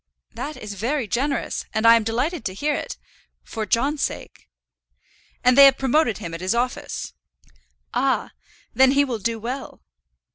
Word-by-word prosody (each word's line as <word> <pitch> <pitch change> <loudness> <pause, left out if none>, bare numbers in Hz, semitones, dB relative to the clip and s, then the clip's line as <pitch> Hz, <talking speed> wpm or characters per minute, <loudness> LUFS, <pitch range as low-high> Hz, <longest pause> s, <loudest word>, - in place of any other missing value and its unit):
"That 300 +1 -6
is 210 -1 -7
very 240 +5 -2
generous; 270 +7 -2
and 220 +1 0
I 230 0 +9
am 230 - +2
delighted 255 +9 -2
to 185 - -3
hear 295 +8 0
it, - - -5 0.5
for 220 -1 -5
John's 275 +5 +1
sake." - - -5 0.9
"And 250 0 +5
they 280 +1 +10
have 270 -1 +6
promoted 265 -4 +1
him 165 - -7
at 165 - -6
his 185 +5 0
office." 245 +1 -3 0.8
"Ah! - - 0 0.4
then 265 0 +5
he 285 0 +4
will 240 -5 -3
do 230 +3 -2
well." 255 +4 -6
245 Hz, 160 wpm, -23 LUFS, 225-275 Hz, 0.9 s, they